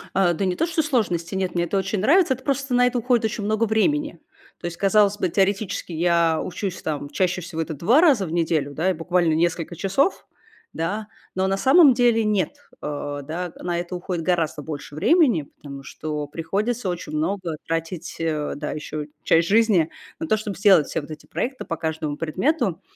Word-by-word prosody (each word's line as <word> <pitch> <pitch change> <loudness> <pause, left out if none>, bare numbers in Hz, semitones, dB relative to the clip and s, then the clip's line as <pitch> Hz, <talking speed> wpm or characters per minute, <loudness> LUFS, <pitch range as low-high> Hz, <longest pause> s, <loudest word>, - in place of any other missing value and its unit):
Э, 180 -3 +3
да 190 +4 -1
не 180 - 0
то 330 - +1
чтобы 325 -2 0
сложности, 180 - 0
нет, 185 -2 -2
мне 175 0 +1
это 195 - -1
очень 195 +1 -1
нравится. 305 - +4
Это 260 0 -10
просто 275 -1 -1
на 245 0 +5
это 250 0 -1
уходит 240 -1 +2
очень 220 -1 -2
много 215 +2 +1
времени. 295 +8 0 0.4
То - - -9
есть, 170 -1 -4
казалось 205 +1 +3
бы, 185 - 0
теоретически 195 +1 0
я 170 -1 +2
учусь 185 +1 -4
там 145 -2 -3
чаще 180 +4 0
всего 170 -1 -4
это 160 0 -3
2 220 - +4
раза 270 - +4
в 160 - -6
неделю, 160 -4 0
да, 175 +6 +1
и - - 0
буквально 170 0 +1
несколько 170 +1 0
часов, 195 - 0 0.5
да. 205 +7 -3 0.3
Но 190 0 +1
на 195 0 0
самом 275 - +6
деле 235 -2 +3
нет, 205 -6 0 0.2
э, 145 -1 -4
да. 170 +4 -4
На 175 -1 -3
это 175 +1 -5
уходит 175 -1 -4
гораздо 160 -3 0
больше 145 -1 -7
времени, 245 - +3
потому 140 -2 -9
что 150 0 -5
приходится 200 +9 -2
очень 175 -3 -5
много 170 +1 -1
тратить, 165 +1 -4
э, 155 -2 -1
да, 150 +1 -4
ещё 150 0 -5 0.2
часть 165 +1 +3
жизни 205 -7 +4 0.3
на 325 - -3
то, 220 - +3
чтоб 210 -2 -5
сделать 195 -7 +5
все - - -2
вот 145 - -12
эти 155 0 -9
проекты 260 +2 -4
по 165 - -3
каждому 160 -2 -3
предмету. 190 - 0
180 Hz, 195 wpm, -23 LUFS, 160-215 Hz, 0.5 s, самом